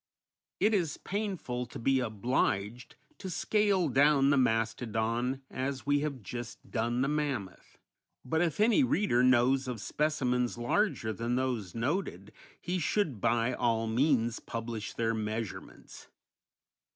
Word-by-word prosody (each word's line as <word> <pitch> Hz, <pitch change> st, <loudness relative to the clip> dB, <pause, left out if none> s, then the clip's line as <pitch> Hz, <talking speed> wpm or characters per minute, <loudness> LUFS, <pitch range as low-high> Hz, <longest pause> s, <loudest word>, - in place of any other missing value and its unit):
It 215 Hz, +2 st, +3 dB
is 175 Hz, -7 st, 0 dB
painful 185 Hz, -, -3 dB
to -, -, -9 dB
be 135 Hz, +3 st, +2 dB
obliged 115 Hz, -1 st, -1 dB, 0.2 s
to 190 Hz, -, -6 dB
scale 200 Hz, 0 st, +1 dB
down 140 Hz, +1 st, +4 dB
the -, -, +4 dB
mastodon 115 Hz, +1 st, 0 dB
as 130 Hz, +1 st, -3 dB
we 145 Hz, 0 st, +3 dB
have 140 Hz, -5 st, -4 dB
just 120 Hz, +3 st, -8 dB
done 120 Hz, +2 st, 0 dB
the -, -, +1 dB
mammoth, 145 Hz, -10 st, -3 dB, 0.5 s
but 160 Hz, +5 st, 0 dB
if 170 Hz, -1 st, 0 dB
any 230 Hz, +6 st, +5 dB
reader 205 Hz, -, +2 dB
knows 130 Hz, +1 st, +4 dB
of 125 Hz, -3 st, -4 dB
specimens 125 Hz, -1 st, 0 dB
larger 120 Hz, -, 0 dB
than 115 Hz, +2 st, -2 dB
those 125 Hz, -8 st, -2 dB
noted, 115 Hz, -, -2 dB, 0.3 s
he 180 Hz, +1 st, -2 dB
should 155 Hz, -, 0 dB
by 115 Hz, +2 st, +2 dB
all 115 Hz, -2 st, +1 dB
means 120 Hz, 0 st, +1 dB
publish 115 Hz, -2 st, -5 dB
their 115 Hz, -1 st, 0 dB
measurements. 110 Hz, 0 st, -6 dB
125 Hz, 130 wpm, -30 LUFS, 115-150 Hz, 0.5 s, any